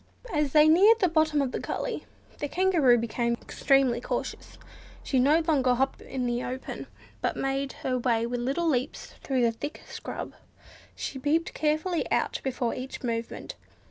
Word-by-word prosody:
As 300 -3 +1
they 300 +1 +6
neared 395 +8 +7
the 375 - +4
bottom 315 -3 +2
of 260 - -2
the - - -3
gully - - -4 0.3
the 290 - -2
Kangaroo 330 -8 +4
became 235 +1 -1
extremely 270 -3 +2
cautious. - - -4 0.5
She 265 - +1
no 295 +6 +4
longer 275 -6 +2
hopped 265 +2 -1
in 255 -2 -4
the 240 0 -1
open, 255 +1 -5 0.3
but - - -1
made 270 0 -1
her 255 -1 +1
way 235 -2 +1
with 245 +1 -2
little 275 +8 0
leaps 265 -2 -2
through 260 -3 0
the 230 - +4
thick 290 +6 -6
scrub. - - -6 0.6
She 270 - -5
peeped 310 +5 +1
out - - -30
carefully 310 +3 0 0.4
before 250 -3 -1
each 260 +1 -7
movement. 230 -1 -4
270 Hz, 165 wpm, -27 LUFS, 245-310 Hz, 0.6 s, neared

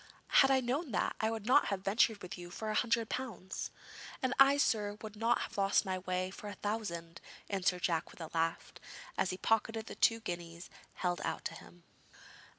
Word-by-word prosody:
'Had 270 - +6
I 265 -1 +4
known 260 +4 -1
that, - - 0
I 220 - +2
would 225 -2 -4
not 260 +5 +5
have 195 -1 -3
ventured 210 +1 +3
with 180 - -6
you 175 -1 -9
for 215 +4 -4
a - - -1
hundred 230 0 +2
pounds.' 220 -8 -4 0.5
'And 260 0 +2
I, 275 +1 +7
sir, 210 -7 +1
would 215 -1 -7
not 230 +2 +2
have - - -4
lost 195 +2 +3
my 185 -1 -1
way 185 0 -2
for 210 - -9
a 205 - -5
thousand,' 170 -6 -4 0.3
answered 180 -2 +1
Jack 165 -2 +1
with - - -15
a 160 - -7
laugh, 165 0 -1 0.4
as 185 - +1
he 185 - -3
pocketed 225 +2 +1
the - - -7
two 230 -1 +3
guineas 170 -3 -6 0.2
held 175 -1 -1
out - - -3
to - - -2
him. 85 +1 -14
205 Hz, 200 wpm, -34 LUFS, 180-225 Hz, 0.5 s, I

